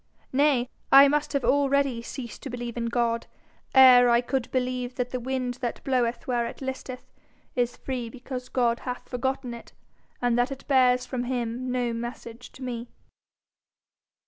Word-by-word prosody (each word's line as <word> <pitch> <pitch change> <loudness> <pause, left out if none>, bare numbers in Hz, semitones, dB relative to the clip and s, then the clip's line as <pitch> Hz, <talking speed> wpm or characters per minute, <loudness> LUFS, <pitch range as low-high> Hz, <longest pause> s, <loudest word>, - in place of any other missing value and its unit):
Nay, 270 -3 +3 0.2
I 275 +1 +10
must 295 +1 0
have 280 - 0
already 275 -3 +2
ceased 235 -1 -8
to 275 - -6
believe 240 -1 -5
in 235 -1 -2
God 230 -1 0 0.5
ere 250 -2 +8
I 235 0 +5
could 250 0 -2
believe 250 -1 -2
that 250 -1 -2
the 255 - -2
wind 250 0 -3
that 240 -2 -3
bloweth 245 -3 0
where 240 -2 0
it - - -9
listeth 260 -1 -6 0.4
is 245 -1 0
free 250 -3 -4
because 255 +1 -7
God 240 -2 +1
hath 250 0 -6
forgotten 260 0 -2
it, 235 - -11 0.5
and 245 -1 +1
that 245 +3 +1
it 275 - -8
bears 250 -2 +4
from 245 0 -3
him 245 0 -2
no 245 -2 0
message 235 0 -7
to 260 - -10
me. 240 -1 -5
250 Hz, 165 wpm, -26 LUFS, 240-260 Hz, 0.5 s, I